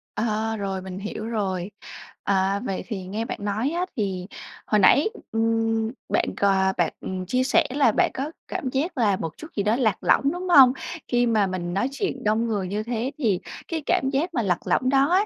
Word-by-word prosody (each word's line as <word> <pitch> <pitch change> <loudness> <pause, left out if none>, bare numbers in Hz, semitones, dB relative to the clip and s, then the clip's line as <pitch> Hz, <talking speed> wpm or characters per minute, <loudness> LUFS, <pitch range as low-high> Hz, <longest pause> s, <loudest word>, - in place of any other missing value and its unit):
Ờ, 220 0 -1
rồi, 195 -2 -3
mình 190 0 -7
hiểu 215 +1 -5
rồi. 195 -4 -2 0.5
À, 195 0 +1
vậy 195 - -3
thì 200 -5 -4
nghe 215 +4 -3
bạn - - -4
nói 210 +6 -1
á 350 +2 -1
thì 190 -4 -2 0.4
hồi 210 - +3
nãy, 280 - +5 0.2
ừm, 225 0 +1 0.2
bạn - - +2
c - - -9 0.4
bạn, - - +1
ừm, 185 -1 -4
chia 255 +7 +1
sẻ 325 +4 +3
là 265 -3 +3
bạn - - +2
có 285 +4 -3 0.2
cảm 260 - -3
giác 300 +6 -2
là 210 -5 +3
một 165 -3 -5
chút 315 - -9
gì 200 - 0
đó 210 +2 +2
lạc 225 -6 +1
lõng, 280 +1 +3
đúng 360 +1 -5
hông? 265 -6 +8 0.3
Khi 245 0 +2
mà 215 -3 +3
mình 175 -2 -3
nói 225 +7 0
chuyện 275 -4 -3
đông 220 +2 +1
người 205 -5 -1
như 210 +3 -2
thế 240 +3 -2
thì 215 -10 +1 0.3
cái 325 -2 -3
cảm 265 - +2
giác 335 +6 0
mà 240 - +1
lạc 180 -5 -1
lõng 255 - +2
đó 275 +2 +4
á, 390 +3 +4
225 Hz, 210 wpm, -24 LUFS, 195-265 Hz, 0.5 s, hông